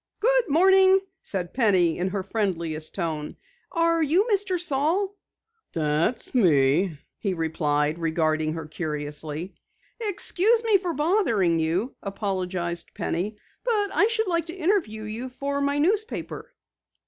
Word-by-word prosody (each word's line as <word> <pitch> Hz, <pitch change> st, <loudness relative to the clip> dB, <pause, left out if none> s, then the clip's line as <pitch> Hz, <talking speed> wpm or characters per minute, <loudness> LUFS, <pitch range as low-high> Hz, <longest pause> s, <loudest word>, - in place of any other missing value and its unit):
"Good -, -, +2 dB
morning," 380 Hz, +4 st, +6 dB, 0.2 s
said 180 Hz, -3 st, -3 dB
Penny 190 Hz, -10 st, +2 dB
in 180 Hz, -, 0 dB
her 190 Hz, 0 st, -2 dB
friendliest 170 Hz, -7 st, -2 dB
tone. 160 Hz, -5 st, -3 dB, 0.4 s
"Are 335 Hz, -1 st, +2 dB
you 340 Hz, -, +3 dB
Mr. 385 Hz, -3 st, +1 dB
Saal?" 355 Hz, +6 st, 0 dB, 0.6 s
"That's 160 Hz, +8 st, 0 dB
me," 160 Hz, -, +3 dB, 0.2 s
he 195 Hz, -3 st, -1 dB
replied, 155 Hz, -1 st, 0 dB
regarding 155 Hz, -1 st, 0 dB
her 160 Hz, -1 st, -5 dB
curiously. 150 Hz, +2 st, -4 dB, 0.5 s
"Excuse 435 Hz, +1 st, +1 dB
me 435 Hz, -4 st, +4 dB
for 360 Hz, -2 st, -3 dB
bothering 260 Hz, -, +2 dB
you," 175 Hz, +10 st, -1 dB
apologized 185 Hz, -4 st, -3 dB
Penny, 205 Hz, +6 st, -2 dB, 0.3 s
"but 425 Hz, -5 st, 0 dB
I 420 Hz, -, +4 dB
should 445 Hz, -1 st, 0 dB
like 335 Hz, -2 st, 0 dB
to 335 Hz, -, -6 dB
interview 330 Hz, -, 0 dB
you 225 Hz, +4 st, -5 dB
for 280 Hz, +2 st, -3 dB
my 280 Hz, +1 st, +1 dB
newspaper." 430 Hz, +6 st, -1 dB
215 Hz, 125 wpm, -25 LUFS, -, 0.6 s, morning